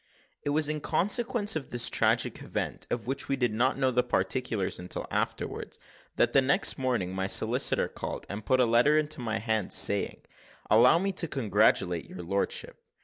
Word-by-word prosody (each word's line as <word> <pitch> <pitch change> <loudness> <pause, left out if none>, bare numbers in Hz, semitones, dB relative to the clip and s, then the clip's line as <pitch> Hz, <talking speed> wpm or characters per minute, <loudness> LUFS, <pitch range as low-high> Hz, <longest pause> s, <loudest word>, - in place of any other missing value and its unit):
It - - -3
was 150 +1 +2
in 150 0 -2
consequence 210 - 0
of 140 -5 -5
this 120 -1 +1
tragical - - +1
event, - - -4
of 120 - -3
which 135 +3 -4
we 135 - +1
did 125 -4 -1
not 125 +5 +1
know 130 -1 +1
the 125 0 +2
particulars 115 -2 -2
until 90 +1 -5
afterwards, - - -3 0.4
that 120 - +2
the 135 - +5
next 135 +1 +2
morning 120 -9 -1
my 95 0 -2
solicitor - - +2
called, - - -6
and 100 +2 -6
put 130 +5 +1
a 125 - +5
letter 120 +6 +3
into 155 -3 -1
my 110 -2 -2
hand, 110 -3 -1
saying, 100 0 +2 0.5
"Allow 120 +8 +6
me 195 +3 -1
to 180 -3 -2
congratulate 105 - +1
your 90 - -8
lordship." 100 +3 -2
125 Hz, 180 wpm, -28 LUFS, 105-145 Hz, 0.5 s, Allow